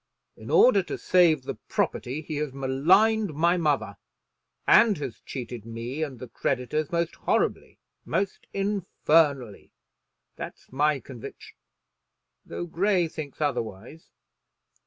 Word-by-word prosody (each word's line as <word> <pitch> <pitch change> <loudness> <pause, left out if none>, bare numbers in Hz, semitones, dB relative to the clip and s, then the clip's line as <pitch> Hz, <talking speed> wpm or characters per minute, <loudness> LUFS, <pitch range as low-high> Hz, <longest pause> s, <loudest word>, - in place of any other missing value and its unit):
In - - -11
order 245 -6 +6
to 185 - -5
save 170 -6 +3
the - - -6
property 140 +6 -1
he 150 0 -5
has 150 -3 -3
maligned 175 +9 +3
my 170 +3 +3
mother, 145 - 0 0.7
and 215 -5 +6
has 135 -6 -6
cheated 120 -4 -6
me 115 +6 -6
and 140 -5 -3
the 125 - -8
creditors 140 +6 -2
most 170 0 0
horribly - - -1 0.3
most 195 -1 -2
infernally. 160 - +1 0.6
That's - - -9
my 145 +1 +1
conviction, 125 -4 -11 0.9
though - - -5
Grey 180 +1 +1
thinks 155 -3 -8
otherwise. 125 +1 -4
150 Hz, 115 wpm, -26 LUFS, 130-175 Hz, 0.9 s, order